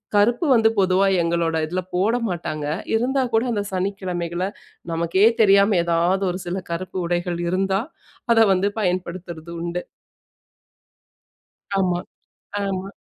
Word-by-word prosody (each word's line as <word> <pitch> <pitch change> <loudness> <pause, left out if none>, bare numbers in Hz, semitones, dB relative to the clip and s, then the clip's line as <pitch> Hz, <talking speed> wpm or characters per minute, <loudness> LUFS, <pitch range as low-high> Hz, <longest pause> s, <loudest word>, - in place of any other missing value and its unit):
கருப்பு 235 +9 +3
வந்து 225 -2 +5
பொதுவா 190 +1 +3 0.2
எங்களோட 170 -1 0
இதில 180 +4 -2
போட 200 +6 +2
மாட்டாங்க. 155 -4 -4 0.3
இருந்தா 260 +4 +1
கூட, 225 +2 +3
அந்த 205 -3 -1
சனிக்கிழமைகள்ல 185 -2 -2 0.5
நமக்கே 170 +5 +2 0.2
தெரியாம 200 -1 +5
எதாவது 170 +3 +1
ஒரு 180 - -5
சில 185 +2 -2
கருப்பு 185 +2 -4
உடைகள் 175 0 -1
இருந்தா, 190 +2 +1 0.5
அத 225 - +4
வந்து 190 +2 +1
பயன்படுத்துறது 175 -3 -3
உண்டு. 175 +1 -3 1.9
ஆமா, 180 -2 +1 0.7
ஆமா. 195 0 -3
185 Hz, 115 wpm, -22 LUFS, 170-200 Hz, 1.9 s, வந்து